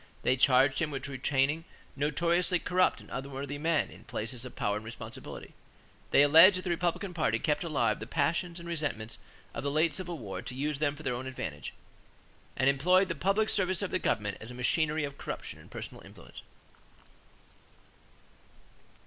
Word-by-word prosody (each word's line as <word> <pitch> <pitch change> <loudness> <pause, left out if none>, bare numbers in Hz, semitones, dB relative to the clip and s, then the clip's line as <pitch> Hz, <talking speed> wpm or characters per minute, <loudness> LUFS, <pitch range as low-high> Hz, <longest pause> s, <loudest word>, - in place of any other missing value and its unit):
They 130 - +3
charged 135 +1 +4
him 160 -3 0
with 135 -1 -4
retaining 140 +3 0 0.3
"notoriously 170 +5 +2
corrupt 180 +1 +2
and - - -15
unworthy 140 +1 -5
men 160 0 +1
in - - -14
places 115 +2 -3
of 130 - -9
power 105 0 0
and 105 - -7
responsibility." 110 +1 -9 0.6
They 140 - +6
alleged 165 +6 +8
that - - -3
the 180 - -1
Republican 175 +3 -1
party 155 -10 +1
kept 150 +8 0
"alive 155 -4 +1
the - - -7
passions 170 +1 0
and 170 - -9
resentments 145 -10 -3 0.3
of - - -5
the 140 - 0
late 155 +2 +2
civil 175 0 -4
war 95 -7 -6
to 125 - -7
use 145 +1 -2
them 145 -1 +1
for 155 - -10
their 130 - 0
own 125 +2 -4
advantages," 80 - -5 0.9
and 130 - +2
employed 180 +8 +4
the - - 0
"public 195 +7 +1
service 190 -2 +1
of 195 - -3
the 185 - +1
government 105 - -1
as 110 - -8
a 125 - -8
machinery 150 +5 +1
of 140 -1 -5
corruption - - -6
and - - -15
personal - - -8
influence." - - -12
145 Hz, 175 wpm, -30 LUFS, 130-170 Hz, 0.9 s, alleged